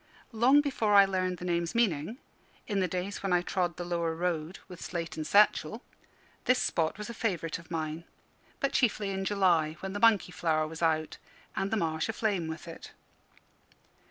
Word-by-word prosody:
Long 250 +6 +5
before 230 -8 +1
I 200 0 +9
learnt 185 -1 -1
the 180 - -7
name's 170 +2 -1
meaning, 210 - +1 0.5
in 205 -3 -1
the 185 - +2
days 180 +3 -4
when 195 - -2
I 175 0 +3
trod 180 -2 -1
the 175 - -4
lower 170 -2 -1
road 170 0 -2
with 180 -2 -11
slate 170 -2 -4
and 155 -1 -4
satchel, 205 +5 +3 0.6
this 250 - +4
spot 160 0 0
was 210 0 -6
a 235 - -6
favourite 175 -9 -2
of 165 - -16
mine 160 0 -4 0.5
but 275 - 0
chiefly 215 -5 +1
in 195 0 -3
July, 180 -6 +2
when 190 0 -5
the 205 - -3
monkey 215 -5 +4
flower 155 -3 0
was 160 +1 -9
out, 155 -1 0 0.4
and 195 - -1
the 220 - 0
marsh 160 0 -1
aflame 205 -6 -1
with 160 +2 -7
it. 165 - -10
180 Hz, 185 wpm, -30 LUFS, 165-205 Hz, 0.6 s, I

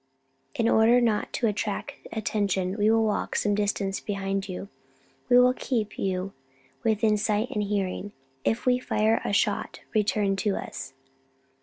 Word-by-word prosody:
"In 230 - +1
order 230 +2 +5
not 225 -3 +1
to 240 - 0
attract 210 -1 -2 0.2
attention, 200 -4 -1
we 210 0 +2
will 225 0 +4
walk 215 -1 -1
some 205 - +1
distance 200 -1 0
behind 195 -1 -3
you. 185 +2 -5 0.6
We 245 - +7
will 250 0 +5
keep 230 -5 -2
you 190 0 -2 0.5
within 220 -1 +2
sight 215 +4 0
and 210 - -1
hearing. 200 -1 -2 0.3
If 225 - 0
we 250 0 +3
fire 220 -2 +1
a - - -2
shot, 200 - 0
return 210 -2 +2
to 200 0 0
us." - - -6
210 Hz, 150 wpm, -26 LUFS, 200-225 Hz, 0.6 s, We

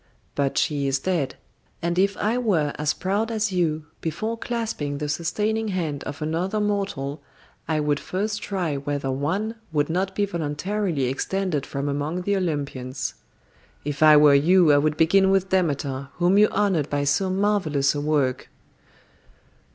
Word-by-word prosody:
But 140 -1 -1
she 145 -2 +1
is 135 0 +1
dead, 170 -7 -1 0.4
and 170 +1 -1
if 200 +1 +2
I 215 +3 0
were 170 -12 +1
as 150 -1 +1
proud 200 +4 -1
as 215 -2 -1
you, 160 -4 0 0.2
before 215 +8 -2
clasping 225 -12 -3
the 150 +1 -3
sustaining 210 +8 -1
hand 165 -8 -2
of 145 +1 -5
another 175 +7 -1
mortal 195 -9 -2 0.5
I 155 -1 +1
would 145 -1 +1
first 205 +3 -3
try 180 -8 -2
whether 140 -1 -2
one 185 +12 -2
would 150 0 0
not 190 +2 -1
be 205 - +2
voluntarily 170 0 -2
extended 150 +4 -1
from 140 +1 -3
among 145 +5 -2
the 200 +2 +1
Olympians. 140 -7 -3 0.7
If 145 0 -4
I 155 -1 +8
were 150 -1 +7
you, 165 +3 +5
I 145 - +5
would 150 +1 0
begin 190 +4 +4
with 195 -1 +2
Demeter, 140 -7 0
whom 180 +4 +3
you 210 - +7
honoured 190 -8 0
by 145 0 0
so 145 +7 +1
marvellous 185 -8 +1
a 145 - -3
work." 145 -4 0
160 Hz, 160 wpm, -24 LUFS, 145-195 Hz, 0.7 s, I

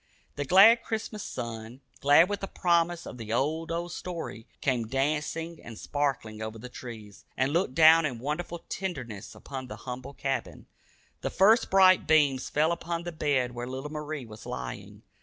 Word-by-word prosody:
The 145 - -3
glad 205 - +7
Christmas 220 -2 -4
sun, 115 -1 -6 0.2
glad 145 +5 +6
with 205 0 -3
the 195 - -4
promise 170 -2 +1
of 125 - -9
the 110 -1 -6
"old, 155 +7 0
old 170 +1 -3
story," 170 -11 -6
came 125 -4 0
dancing 150 +5 -2
and 115 -2 -10
sparkling 135 -7 -2
over 110 0 -5
the 125 +3 -9
trees, 110 -5 -10
and 135 +2 +1
looked 170 -6 0
down 160 0 +7
in 125 -4 -5
wonderful 155 +7 -4
tenderness 130 - -5
upon 130 -2 -7
the - - -7
humble 130 +2 -6
cabin. 135 -1 -3 0.6
The - - -2
first 220 +5 +4
bright 185 -1 +5
beams 145 -4 +3
fell 155 +3 +2
upon 170 0 -3
the 175 - -5
bed 140 -6 0
where 120 0 -6
little 135 +3 -6
Marie 150 -3 -5
was 110 -1 -11
lying. 60 -1 -7
145 Hz, 170 wpm, -28 LUFS, 125-170 Hz, 0.6 s, glad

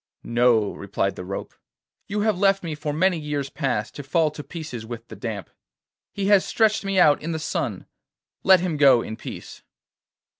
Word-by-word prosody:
'No,' 120 -3 +2
replied 100 -1 -2
the - - -7
rope; 95 +2 -6 0.5
'you 210 +1 -2
have 210 -3 +1
left 195 -1 +3
me 165 -2 -3
for 150 0 -4
many 175 +3 +2
years 145 -2 -3
past 120 -5 -2
to - - -7
fall 155 +3 +1
to 150 0 -8
pieces 150 -10 -7
with 115 0 -8
the - - -8
damp. 110 -5 -5 0.6
He 200 - -3
has 200 -1 +5
stretched 220 -2 +2
me 195 -1 +1
out 150 -4 +5
in 165 +2 -3
the - - -2
sun. 160 - -3 0.6
Let 190 -2 +6
him 175 -4 -1
go 135 -5 +6
in 110 - -6
peace. - - -9
150 Hz, 185 wpm, -24 LUFS, 120-185 Hz, 0.6 s, Let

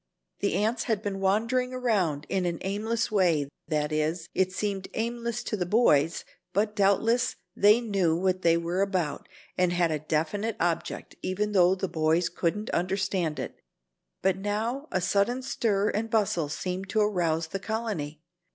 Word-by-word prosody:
The 200 - 0
ants 220 +4 0
had 220 -3 0
been 195 -1 -3
wandering 230 +6 +1
around 190 - 0
in 185 -2 0
an 170 -1 -2
aimless 220 +4 -1
way 170 -8 +3 0.2
that 150 -1 0
is, 155 +2 -1
it 185 0 +1
seemed 195 0 -2
aimless 235 +1 -2
to - - -2
the 190 - -1
boys, 170 -7 +3 0.3
but 210 +2 +1
doubtless 225 +5 +2 0.2
they 210 +4 +5
knew 195 -8 +1
what 185 +1 0
they 165 -1 +4
were 170 +3 -1
about 185 -7 -1 0.3
and 180 -1 +3
had 175 -2 +2
a 155 - -1
definite 160 +9 -1
object, 170 -1 -2
even 205 +3 -1
though 185 -2 +5
the 190 0 -2
boys 165 0 +1
couldn't 185 +5 -2
understand 185 -3 0
it. - - -6 0.6
But 190 -1 +3
now 220 +8 -2
a 185 - 0
sudden 210 +8 +1
stir 210 -5 +1
and 225 +2 -2
bustle 200 -8 +1
seemed 185 +4 -4
to 215 +1 +2
arouse 170 -6 +1
the 195 - -3
colony. 190 -9 -4
195 Hz, 160 wpm, -27 LUFS, 170-215 Hz, 0.6 s, they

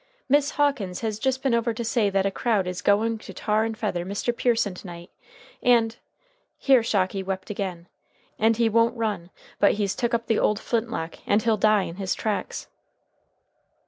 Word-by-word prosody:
"Miss 285 +1 +3
Hawkins 275 -11 0
has 215 -2 -2
just 265 +2 -1
been 265 -3 +2
over 235 0 +1
to 235 0 -4
say 225 -2 +2
that 195 0 +1
a 195 - +1
crowd 215 -3 0
is 180 0 -4
going 220 +2 +2
to - - -11
tar 215 0 +1
and 225 -1 -4
feather 190 -6 -2
Mr. 200 +6 -2
Pearson 230 -5 +1
to 180 - -10
night. 175 0 -10 0.5
And 230 -2 +3 0.3
" - - -38 0.2
here 265 -3 +4
Shocky 195 -3 0
wept 190 +1 -4
again. 185 -4 -5 0.5
"And 225 +1 +3
he 230 -1 +3
won't 230 +2 +2
run, 205 -6 -2 0.3
but 200 - +5
he's 200 -2 -1
took 235 0 0
up 230 0 -2
the 225 -2 +1
old 210 0 +2
flintlock, 225 -9 -3
and 210 +1 +3
he'll 225 -2 +3
die 215 -1 +3
in 170 - -7
his 190 -2 -1
tracks." 215 -2 -3
215 Hz, 190 wpm, -25 LUFS, 195-235 Hz, 0.5 s, but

